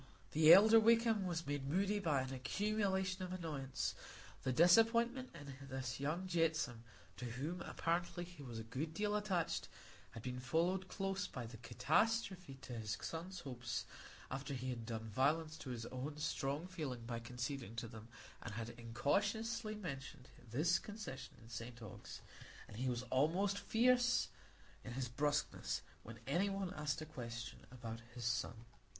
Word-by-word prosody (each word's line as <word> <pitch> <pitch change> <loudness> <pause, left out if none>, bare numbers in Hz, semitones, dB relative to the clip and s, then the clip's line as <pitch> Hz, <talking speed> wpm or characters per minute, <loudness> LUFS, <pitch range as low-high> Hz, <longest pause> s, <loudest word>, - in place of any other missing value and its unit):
The 155 +1 +8
elder 220 +4 +10
Wakem 225 -3 +4
was 170 -1 -1
made 140 -1 -2
moody 200 +6 +2
by 150 -8 +2
an 130 0 -4
accumulation 190 +6 0
of 180 - -4
annoyance; 150 -7 -2 0.5
the 130 - 0
disappointment 230 - +5
in 140 -2 -8
this 130 -1 -3
young 155 +7 -1
Jetsome, 160 -9 +1 0.4
to 125 - -4
whom, 145 +10 -3
apparently, 175 +1 -1
he 175 -3 -10
was 120 -4 -6
a 115 - -4
good 140 +8 -3
deal 210 +2 +1
attached, 195 -5 0 0.4
had 115 - -9
been 125 0 -3
followed 175 +8 +1
close 195 0 -1
by 125 -2 -5
the 115 0 -8
catastrophe 180 - +1
to 130 -1 -6
his 105 -1 -2
son's 175 +3 -4
hopes 120 -4 -3 0.5
after 135 +1 -3
he 130 0 -2
had 115 -3 -5
done 110 -1 -3
violence 155 +8 +2
to 135 - -6
his 120 -2 -3
own 135 +5 -4
strong 145 +1 -1
feeling 145 -10 -4
by 115 -1 -2
conceding 125 0 -4
to 115 0 -3
them, 110 -1 -10 0.3
and 110 -3 -5
had 115 +1 -3
incautiously 205 - 0
mentioned 135 -9 -6 0.2
this 155 +9 +3
concession 205 -11 -7
in - - -13
St 115 0 -6
Ogg's; 110 -5 -8 0.5
and - - -10
he 130 +2 +1
was 120 0 -1
almost 185 +9 +3
fierce 245 +4 +4 0.5
in 125 - -6
his 130 0 -1
brusqueness 145 - 0 0.2
when 115 +1 -9
any 175 +9 +2
one 195 -2 -2
asked 150 0 -1
him - - -8
a 155 - -19
question 115 -3 -5
about 115 -2 -6
his 120 -2 -4
son. 120 -1 -1
145 Hz, 160 wpm, -39 LUFS, 125-185 Hz, 0.5 s, elder